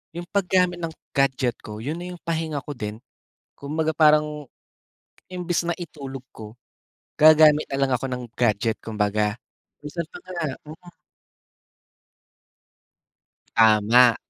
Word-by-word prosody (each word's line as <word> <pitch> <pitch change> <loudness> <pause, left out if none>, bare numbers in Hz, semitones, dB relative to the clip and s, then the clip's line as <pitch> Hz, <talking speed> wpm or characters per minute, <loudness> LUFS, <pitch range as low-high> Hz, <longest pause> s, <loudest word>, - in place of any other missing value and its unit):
yung 175 0 -5
pag-gamit 180 -2 +1
ng 165 - -2 0.2
gadget 135 -3 +1
ko 105 -1 -8
yun 150 +10 -4
na 180 - -6
yung 180 -1 -10
pahinga 160 -2 -2
ko 145 - -5
din 105 -4 -6 0.6
kumbaga 155 +3 -2
parang 150 -2 +3 0.8
imbis 175 -2 -1
na 170 - 0
itulog 135 -6 -8
ko, 110 -1 -11 0.6
gagamit 155 -1 +7
na 135 - -2
lang 135 -1 +1
ako 130 +2 -4
ng 125 -1 -4
gadget 110 -1 +1
kumbaga 105 0 -1 0.4
minsan 150 +4 -5
pa - - -9
nga 185 - -8 0.3
mm. 165 +3 -12 2.6
Tama. 115 +2 +6
145 Hz, 120 wpm, -24 LUFS, 120-165 Hz, 2.6 s, gagamit